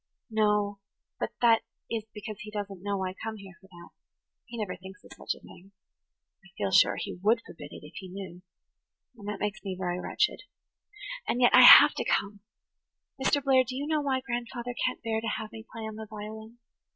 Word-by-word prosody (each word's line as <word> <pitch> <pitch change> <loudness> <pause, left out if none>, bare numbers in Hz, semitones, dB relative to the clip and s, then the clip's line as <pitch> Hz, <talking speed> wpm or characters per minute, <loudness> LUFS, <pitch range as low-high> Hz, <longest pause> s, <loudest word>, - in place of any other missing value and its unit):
"No, 210 -2 +1 0.4
but - - -1
that 230 -2 +5 0.3
is 225 -2 -3
because 210 -1 -8
he 210 - -8
doesn't 200 -3 -6
know 200 -1 -2
I 185 - -3
come 220 +3 -6
here 195 -2 -12
for 190 - -18
that. 175 -2 -14 0.6
He 240 -1 -9
never 210 -4 -3
thinks 190 +3 -13
of - - -17
such - - -4
a - - -18
thing. 190 +3 -15 0.7
I - - -17
feel 100 -2 -1
sure - - +5
he - - -5
would 225 +3 +3
forbid 145 -3 -11
it, - - -11
if 150 - -13
he 190 - -7
knew. 185 -1 -8 0.7
And 205 -3 -11
that 210 -1 -4
makes 210 +1 -3
me 190 -2 -4
very 180 -1 -2
wretched. - - 0 0.9
And 245 - 0
yet 245 -1 +5
I - - +9
have - - +11
to - - -3
come. 200 0 0 0.8
Mr. 285 +1 +2
Blair, 265 -2 +5
do 255 +1 -6
you 280 +2 -3
know 305 0 +1
why 265 -2 0
grandfather 240 -1 -4
can't 255 - -4
bear 220 -1 -1
to 230 - -4
have 220 -1 -6
me 225 0 -10
play 225 - -7
on 220 -1 -6
the 220 0 -7
violin? 220 +2 -9
215 Hz, 205 wpm, -28 LUFS, 195-230 Hz, 0.9 s, have